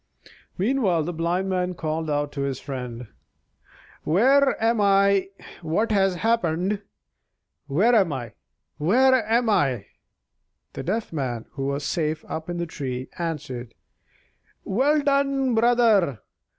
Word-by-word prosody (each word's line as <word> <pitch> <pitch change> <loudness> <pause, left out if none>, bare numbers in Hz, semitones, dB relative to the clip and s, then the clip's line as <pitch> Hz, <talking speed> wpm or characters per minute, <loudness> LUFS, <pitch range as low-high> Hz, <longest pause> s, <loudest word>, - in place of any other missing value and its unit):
Meanwhile 195 - +1
the 175 +3 -4
Blind 170 +3 -1
Man 180 -1 -1
called 160 0 -3
out 145 0 -1
to 140 - -5
his 140 -2 -2
friend: 125 -3 -6 1.0
"Where 265 - +3
am 225 0 +2
I? 200 -1 +3 0.3
What 175 +8 0
has 195 -3 +2
happened? 195 -1 0 0.9
Where 190 - +3
am 195 -8 +4
I? 120 -5 -5 0.5
Where 250 - +4 0.2
am 235 +1 +2
I?" 135 - +1 0.9
The - - -5
Deaf 210 +6 -3
Man 125 -6 -3
(who 135 -1 -4
was 140 +1 -2
safe 155 -2 -2
up 160 +1 -5
in 175 - -3
the 170 - -2
tree) 130 -5 -5
answered: 130 -8 -5 0.9
"Well 285 +9 +2
done, 275 -2 +1
brother! 225 - +3
175 Hz, 125 wpm, -24 LUFS, 145-225 Hz, 1.0 s, am